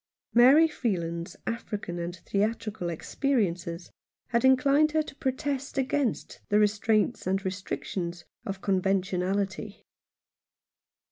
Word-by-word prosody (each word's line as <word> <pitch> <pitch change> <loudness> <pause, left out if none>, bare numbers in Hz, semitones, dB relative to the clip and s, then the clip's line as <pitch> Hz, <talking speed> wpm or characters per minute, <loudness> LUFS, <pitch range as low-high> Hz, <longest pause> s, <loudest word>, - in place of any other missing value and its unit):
Mary 270 +7 +7
Freeland's 170 - -3
African 205 -6 -4
and 170 +1 -4
theatrical 210 -1 -2
ex 165 - -7
periences 180 -10 -1 0.4
had 235 -1 +1
inclined 275 +4 +4
her 315 0 +3
to - - -10
protest 275 0 -2
against 270 -2 -1
the 205 - +4
restraints 210 +1 +2
and 195 +1 0
restrictions 185 -2 -4 0.2
of 195 -4 -5
conventionality. 195 +1 -1
205 Hz, 105 wpm, -28 LUFS, 185-255 Hz, 0.4 s, Mary